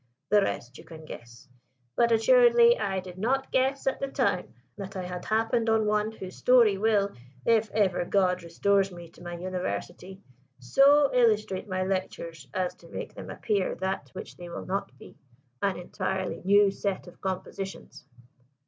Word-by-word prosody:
The 210 0 +5
rest 130 -9 -3
you - - -11
can 160 -1 -12
guess: 120 0 -11 0.5
but 235 0 +3
assuredly 475 - +6
I 190 - -2
did 180 0 -11
not 265 +6 0
guess 265 +1 +1
at 270 - 0
the 275 - -2
time 255 -9 -1 0.2
that 195 -1 -8
I 185 - -3
had 180 0 -6
happened 225 +1 +1
on 220 -1 +3
one 210 +1 +1
whose 190 -4 -9
story 240 -5 +5
will 200 -1 +2 0.3
if 225 -1 +3
ever 195 -5 +1
God 185 -1 +1
restores 195 +3 +1
me 175 -1 -10
to - - -19
my 175 0 -6
University 185 +1 -5 0.4
so 275 - +4
illustrate 215 -5 +2
my 185 0 -1
lectures 170 -5 -4
as 180 +3 -1
to - - -17
make - - -6
them - - -9
appear 200 -4 -1
that 190 +1 -3
which 190 - -9
they 175 -1 -9
will - - -7
not 195 +2 -3
be - - -15 0.4
an 195 -2 0
entirely 190 +1 -3
new 200 +1 +5
set 195 -1 -3
of 175 - -15
compositions." 190 -4 -6
195 Hz, 165 wpm, -27 LUFS, 180-225 Hz, 0.5 s, assuredly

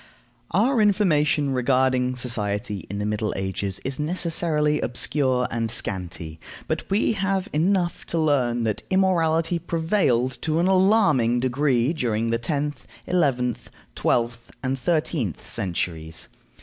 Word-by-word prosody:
Our 230 +5 +2
information 155 -9 +2
regarding 130 0 +2
society 105 -6 -3
in 100 - -4
the 105 - -2
Middle 105 0 -1
Ages 95 0 -3
is 135 +1 -2
necessarily 155 -2 0
obscure 125 0 +1
and 115 -1 -1
scanty, 90 -7 -3 0.3
but - - -3
we 200 +4 +2
have 195 -2 -1
enough 175 +2 0
to 170 - -1
learn 130 -7 +1
that 110 -2 -1
immorality 170 -3 +2
prevailed 160 - 0
to 155 0 0
an 170 - +2
alarming 185 - +3
degree 130 +1 +1
during 115 -6 -1
the 115 - +1
tenth, 145 +4 -3 0.2
eleventh, 130 -9 0 0.2
twelfth, 120 0 -1
and 130 +1 -1
thirteenth 150 - -1
centuries. 80 -3 -3
130 Hz, 125 wpm, -24 LUFS, 115-165 Hz, 0.3 s, alarming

